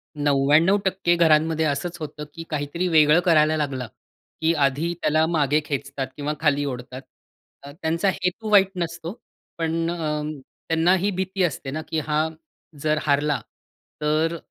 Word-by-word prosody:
99% 165 +6 +3
घरांमध्ये 160 -1 +3
असंच 165 +4 -2
होतं, 150 -1 -6
की 165 - -7
काहीतरी 150 +4 -2
वेगळं 155 -1 +5
करायला 155 -2 +4
लागला, 135 -5 -2 0.5
की 160 +1 +3
आधी 150 +6 -1
त्याला 155 +1 +3
मागे 150 -2 +2
खेचतात 140 -2 -3
किंवा 145 +1 -3
खाली 145 -2 +2
ओढतात. 130 -1 -6 0.6
अ, 140 - -9
त्यांचा 165 +5 +1
हेतू 190 +4 -2
वाईट 195 -2 +6
नसतो. 170 0 -4 0.4
पण 165 0 -1
अं, 150 -3 -2 0.4
त्यांना 165 +2 +3
ही 195 +3 0
भीती 190 0 -2
असते 150 -5 -2
ना, 155 +3 -3
की 160 - -1
हा 155 +1 0 0.5
जर 155 0 +1
हारला, 145 0 +1 0.6
तर, 155 +2 +1
155 Hz, 140 wpm, -23 LUFS, 145-170 Hz, 0.6 s, वाईट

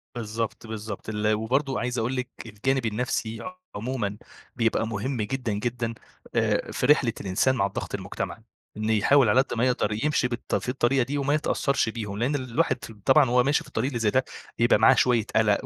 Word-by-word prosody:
بالضبط، 115 0 -4
بالضبط 110 -1 -6
ال 105 0 +1
وبرضه 130 +5 0
عايز 125 +1 -2
أقول 120 +4 -1
لِك 125 0 -3 0.2
الجانب 120 +4 -1
النفْسي 115 +5 -2 0.2
عمومًا 105 -2 -3 0.4
بيبقى 115 -1 +1
مهم 115 +3 -2
جدًا، 120 +1 -2
جدًا، 115 +2 -2 0.4
آآ - - +1
في - - -1
رحلة 135 -4 +4
الإنسان 100 +7 +1
مع 100 - +2
الضغط 100 - -4
المجتمعي، - - -5 0.3
إن 110 +1 -2
يحاول 110 +4 +4
على 125 +5 +5
قد 135 - -5
ما 120 - +3
يقدَر 125 -4 +1
يمشي 140 -4 +2
بالط 120 0 -3
في - - -2
الطريقة 130 0 +2
دي 140 +4 -3
وما 145 +1 +1
يتأثّرش 140 -4 +1
بيهم، 105 -3 -5
لإن 125 +6 0
الواحد 130 -2 0
ف - - -10
طبعًا 145 -5 +5
وهو 125 +1 +4
ماشي 145 +3 +2
في - - -16
الطريق 115 +4 -1
اللي 120 -4 -3
زي 110 -2 +2
ده، 130 +4 +2 0.3
بيبقى 120 -2 +4
معاه 110 - +6
شويّة 120 -4 +3
قلق 105 -2 +3
120 Hz, 190 wpm, -26 LUFS, 110-130 Hz, 0.4 s, معاه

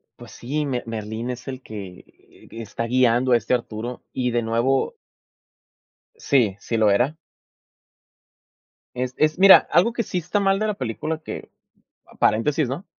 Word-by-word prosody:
pues - - -13
sí, 145 +5 -3
Me 130 -3 -2
Merlín 110 +1 -5
es 125 +1 -6
el 130 -1 -6
que, 100 -6 -9
eh, - - -22
está 115 0 -5
guiando 125 +1 +2
a 120 - +6
este 115 +2 -2
Arturo 120 0 -3
y 125 -1 -1
de 120 0 +1
nuevo. 120 - 0 1.2
Sí, 125 - +1
sí 115 - -3
lo 110 -2 +4
era. 125 +10 +1 1.8
Es 125 +1 -3
es 155 +2 +1
mira, 195 0 +8
algo 215 +7 +4
que 235 - -1
sí 185 - -3
está 180 +4 -1
mal 195 0 +2
de 215 - 0
la 210 - -1
película 155 - -4
que, 160 - -8 0.7
paréntesis, 140 +7 +2
¿no?, 140 +9 -5
125 Hz, 155 wpm, -23 LUFS, 115-155 Hz, 1.8 s, mira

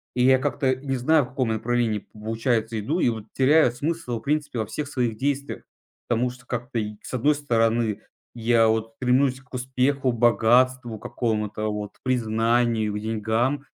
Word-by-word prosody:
И 125 - +2
я 130 0 +5
как-то 135 -1 0
не 135 0 -3
знаю, 145 +2 +3
в - - -13
каком 130 -3 -1
направлении, 110 -1 0
получается, 110 +1 -1
иду 150 - -1
и 125 - +3
вот 110 -2 -5
теряю 135 0 +4
смысл 145 -1 -3
в - - -17
принципе 145 -4 -1
во 110 - 0
всех 145 +7 -5
своих 120 -6 -1
действиях. 140 +2 -2 0.4
Потому 120 +1 +1
что 120 0 -13
как-то, 120 -1 -3
и 105 0 -4
с - - -10
одной 145 +5 +2
стороны, 115 -5 +1 0.3
я 115 -1 +3
вот 110 0 -1
стремлюсь 130 +1 +1
к 130 - -28
успеху, 130 +1 0
богатству 120 0 +3
какому-то, 110 -2 -2
вот 105 -1 -5
признанию, 115 -2 +1
к 105 - -3
деньгам. 115 +6 -1
120 Hz, 165 wpm, -24 LUFS, 110-130 Hz, 0.4 s, я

